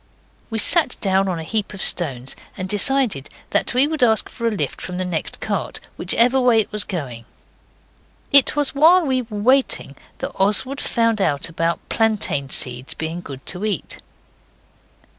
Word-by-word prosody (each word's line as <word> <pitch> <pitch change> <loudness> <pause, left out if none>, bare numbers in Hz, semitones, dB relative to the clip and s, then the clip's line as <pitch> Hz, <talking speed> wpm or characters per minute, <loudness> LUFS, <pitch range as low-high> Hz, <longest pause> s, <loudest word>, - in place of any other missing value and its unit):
We 225 - -3
sat 285 +5 +3
down 195 -1 +1
on 180 -2 -2
a 165 - -6
heap 210 +3 -3
of 190 - -7
stones, 135 -6 +1 0.2
and 185 -1 -4
decided 210 - +1 0.2
that - - 0
we 265 +3 +4
would 315 -2 -4
ask 225 -3 +2
for 235 -2 -4
a - - +3
lift 210 - -4
from 180 -1 -6
the 185 - -2
next 170 -3 -4
cart, - - -3 0.2
whichever 250 +3 +2
way 245 -3 +4
it 215 - -1
was 210 -1 +4
going. 125 -10 -6 1.1
It 280 0 +5
was 290 -2 +1
while 330 +5 +5
we 260 -2 0
were 220 -3 -8
waiting 255 +6 +1 0.2
that - - -5
Oswald 210 +8 +2
found 230 -2 0
out 145 -6 0
about 165 +1 -3
plantain 210 -11 -1
seeds 125 0 0
being 160 +2 -5
good 135 -4 -10
to 180 +2 0
eat. 210 -6 -3
210 Hz, 170 wpm, -20 LUFS, 170-250 Hz, 1.1 s, It